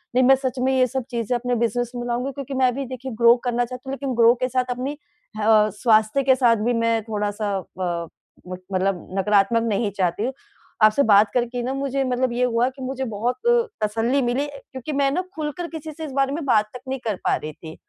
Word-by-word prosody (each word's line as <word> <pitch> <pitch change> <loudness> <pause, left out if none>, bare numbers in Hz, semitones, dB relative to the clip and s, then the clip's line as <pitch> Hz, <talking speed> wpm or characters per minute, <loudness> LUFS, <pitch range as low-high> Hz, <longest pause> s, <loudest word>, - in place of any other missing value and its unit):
नहीं, 255 - +5
मैं 270 +1 +7
सच 260 -1 -3
में 260 +1 +2
ये 255 -1 +4
सब 265 +1 -3
चीज़ें 235 +1 -1
अपने 245 0 -1
बिज़नेस 240 +1 -1
में 240 0 -4
लाऊँगी, 250 +3 -2
क्योंकि 275 0 -7
मैं 250 -1 +4
भी 275 0 -3
देखिए 255 +1 -7
ग्रो 235 +1 +8
करना 245 0 +1
चाहती 255 +2 -9
हूँ, 270 - -3
लेकिन 275 -1 -3
ग्रो 235 0 +6
के - - +3
साथ 255 0 0
अपनी 275 +4 -4 0.4
ह 210 - -3
अ, 215 -1 +5
स्वास्थ्य 220 +4 +3
के 260 -1 +4
साथ 240 -3 +4
भी 245 - +2
मैं 230 -1 +1
थोड़ा-सा 205 -1 -2
अ, 175 -3 -4 0.4
मत 185 0 -7
मतलब 185 -1 -1
नकारात्मक 205 +3 +3
नहीं 210 -1 0
चाहती 185 +3 0
हूँ। 260 +2 -1 0.5
आपसे 215 +6 +5
बात 205 -2 +5
करके 245 0 -1
ना 260 +2 -2
मुझे 275 0 -1
मतलब 255 -1 0
ये 250 +1 0
हुआ 235 0 +1
कि 265 0 -13
मुझे 265 0 -3
बहुत 235 +5 -1 0.5
तसल्ली 230 +6 +1
मिली 250 +4 0
अ, 285 -1 -10
क्योंकि 260 +3 -6
मैं 275 0 +2
ना 360 - 0
खुलकर 310 +2 -4
किसी 320 -2 -7
से 315 +1 -7
इस 280 - -7
बारे 275 0 +1
में 320 0 -3
बात 215 -5 +3
तक 250 - -8
नहीं 265 0 -3
कर 210 - 0
पा - - +3
रही 155 0 -6
थी। 160 +1 -11
245 Hz, 230 wpm, -23 LUFS, 215-265 Hz, 0.5 s, ग्रो